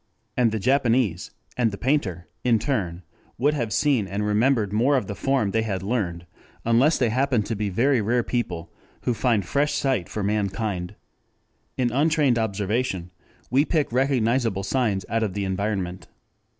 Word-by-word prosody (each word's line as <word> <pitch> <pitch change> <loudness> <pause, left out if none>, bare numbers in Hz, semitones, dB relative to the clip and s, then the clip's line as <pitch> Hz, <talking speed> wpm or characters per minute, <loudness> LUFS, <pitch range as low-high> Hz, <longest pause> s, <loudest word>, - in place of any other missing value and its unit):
And 120 -3 +3
the 110 - -1
Japanese 120 -5 +1 0.3
and 120 -2 +2
the 100 - -7
painter 100 - -1 0.2
in 120 -2 +4
turn 95 - -2 0.3
will 145 +5 +2
have 120 -7 -2
seen 130 -6 +2
and 100 +2 -2
remembered 105 0 +2
more 130 +6 +3
of 125 - -1
the 100 - -5
form 130 -3 0
they 110 - +1
had 95 -4 -3
learned, 95 -6 -2 0.4
unless 120 +7 +4
they 120 - +2
happen 130 -2 +1
to 110 +2 -3
be 105 0 -2
the 90 - -9
very 130 +1 +3
rare 120 +3 +1
people 90 -10 -3 0.3
who 125 - +1
find 115 -4 +1
fresh 145 +8 +1
sight 130 -11 0
for 105 - -3
mankind. 100 -2 -2 0.8
In 125 -2 +1
untrained 145 -2 +2
observation 100 -3 -1 0.4
we 135 +3 +4
pick 155 -4 0
recognizable 120 -5 +1
signs 100 -3 0
out 115 +1 0
of 105 -4 -1
the 100 -1 -1
environment. 95 -1 -2
115 Hz, 165 wpm, -24 LUFS, 100-130 Hz, 0.8 s, in